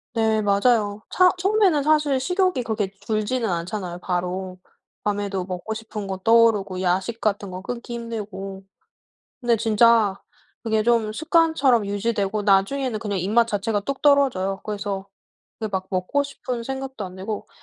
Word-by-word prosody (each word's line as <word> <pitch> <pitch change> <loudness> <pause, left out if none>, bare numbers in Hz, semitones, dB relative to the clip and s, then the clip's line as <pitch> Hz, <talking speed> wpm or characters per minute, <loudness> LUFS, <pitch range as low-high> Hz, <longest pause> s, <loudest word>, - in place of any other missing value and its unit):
네 220 -1 +2
맞아요. 205 0 +2
차 365 0 +6
처음에는 380 -5 +3
사실 300 -2 +3
식욕이 360 -2 +1
그렇게 215 -4 -2
줄지는 220 +2 -1
않잖아요 175 +1 -3
바로. 180 +1 -3 0.5
밤에도 200 -2 -2
먹고 185 +4 -4
싶은 220 -2 -6
거 190 -1 -3
떠오르고 210 -3 +3
야식 190 +6 -1
같은 200 -2 -1
거 185 - -6
끊기 240 +3 -6
힘들고. 200 -5 -6 0.8
근데 240 -2 +2
진짜 220 -2 +4 0.4
그게 220 -2 +1
좀 225 -2 +2
습관처럼 315 - +3
유지되고 205 0 -1
나중에는 215 +5 +2
그냥 205 -3 -2
입맛 220 +6 +2
자체가 205 0 -1
뚝 275 +6 -4
떨어져요. 255 -10 +3
그래서 200 -2 -4 0.5
그 220 - -2
막 190 -2 -3
먹고 185 +10 0
싶은 255 -4 -5
생각도 265 -4 -5
안 185 - -11
들고 200 +2 -5
215 Hz, 320 characters per minute, -23 LUFS, 195-240 Hz, 0.8 s, 차